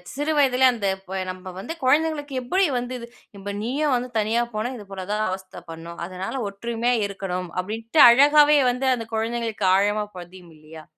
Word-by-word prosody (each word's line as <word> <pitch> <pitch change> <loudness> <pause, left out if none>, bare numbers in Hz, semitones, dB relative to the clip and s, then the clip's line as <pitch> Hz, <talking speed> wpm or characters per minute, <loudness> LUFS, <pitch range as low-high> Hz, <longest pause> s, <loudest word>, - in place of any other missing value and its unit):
சிறுவயதிலே, 280 -3 +2
அந்த 205 -4 -2 0.2
ப 190 +1 -4
நம்ம 185 0 -9
வந்து 320 - -5
குழந்தைகளுக்கு 290 +1 +1
எப்படி 375 +9 +2
வந்து 245 +1 -4
இது? 235 - -9 0.3
"இப்ப 200 +1 -6
நீயும் 275 +4 0
வந்து 250 +1 -3
தனியா 220 +3 +1
போனா, 215 +3 -2
இது 210 - -11
போலதான் 200 +3 -2
அவஸ்தை 190 0 -7
பண்ணும்." 165 +1 -9
அதனால 190 +8 -5
ஒற்றுமையா 235 +4 -2
இருக்கணும் 185 -2 -5
அப்படின்ட்டு, 225 - 0
அழகாவே 295 +4 +6
வந்து 260 +2 -2
அந்த 230 -2 -7
குழந்தைகளுக்கு 225 -2 -2
ஆழமா 205 +2 +1
பதியும் 175 0 -12
இல்லையா? 155 +1 -13
225 Hz, 160 wpm, -23 LUFS, 190-260 Hz, 0.3 s, அழகாவே